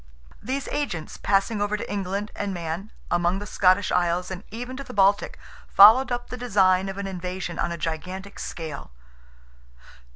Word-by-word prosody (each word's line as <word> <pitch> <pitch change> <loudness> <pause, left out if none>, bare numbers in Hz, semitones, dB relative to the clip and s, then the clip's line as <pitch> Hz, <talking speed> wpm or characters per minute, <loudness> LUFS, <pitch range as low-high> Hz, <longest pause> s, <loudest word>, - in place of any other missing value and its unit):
These 270 +2 -3
agents 175 - -3
passing 205 +2 +1
over 205 +1 0
to - - -6
England 200 +1 -3
and 200 -2 -3
Man, 170 +4 -5 0.2
among 175 +1 +2
the 205 - -5
Scottish 185 0 +3
isles, 180 +1 +1
and 185 +1 -6
even 245 +4 -6
to 275 - -5
the - - -10
Baltic, 200 +1 +3 0.3
followed 230 +6 +7
up 245 0 -3
the 250 - -4
design 195 -5 +3
of 195 - -6
an 200 - -3
invasion 180 -2 -5
on - - 0
a 170 - -3
gigantic 185 +5 -5
scale. 155 - -6
195 Hz, 165 wpm, -25 LUFS, 180-210 Hz, 0.3 s, followed